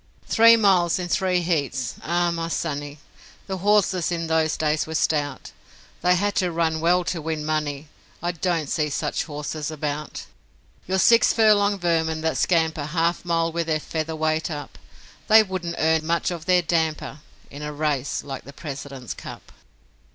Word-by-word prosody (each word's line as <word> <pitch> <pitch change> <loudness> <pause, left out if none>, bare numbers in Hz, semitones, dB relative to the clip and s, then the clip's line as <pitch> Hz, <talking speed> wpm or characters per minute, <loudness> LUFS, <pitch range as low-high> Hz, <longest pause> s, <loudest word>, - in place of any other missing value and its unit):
Three 230 +1 +6
miles 185 -6 +3
in 180 -1 -4
three 185 -1 +1
heats: 140 -8 -1
Ah, 175 +1 0
my 165 -1 -3
sonny, 145 -3 -3 0.5
The 190 -1 -4
horses 195 -3 +2
in 165 -1 -2
those 160 -1 +1
days 155 0 0
were 160 - -5
stout, 145 -3 -1 0.5
They 180 +1 +4
had 205 +3 0
to 180 -2 +1
run 160 -1 0
well 175 +2 +3
to 170 -1 -3
win 155 -1 -3
money; 150 -1 -2 0.3
I 175 +1 -1
don't 170 -2 -1
see 150 +2 -1
such 140 - -2
horses 150 0 -5
about. 150 -1 -4 0.6
Your 190 +1 0
six 230 +4 +5
furlong 210 -2 +4
vermin 160 -3 0
that 160 0 -1
scamper 160 -4 +1
Half 170 +3 -1
a - - -13
mile 165 -1 +1
with 170 0 -2
their 155 -1 +1
feather 160 +1 -4
weight 155 0 0
up; 145 -2 -7 0.5
They 220 0 +7
wouldn't 185 -4 -4
earn 160 0 +2
much 170 +2 0
of 170 -2 -6
their 180 -1 +3
damper 160 -2 -1 0.3
In 145 - -9
a 150 0 -4
race 145 -2 -2
like 135 -2 -7
the 140 - -12
President's 140 -4 -7
Cup. - - -11
160 Hz, 170 wpm, -23 LUFS, 150-175 Hz, 0.6 s, They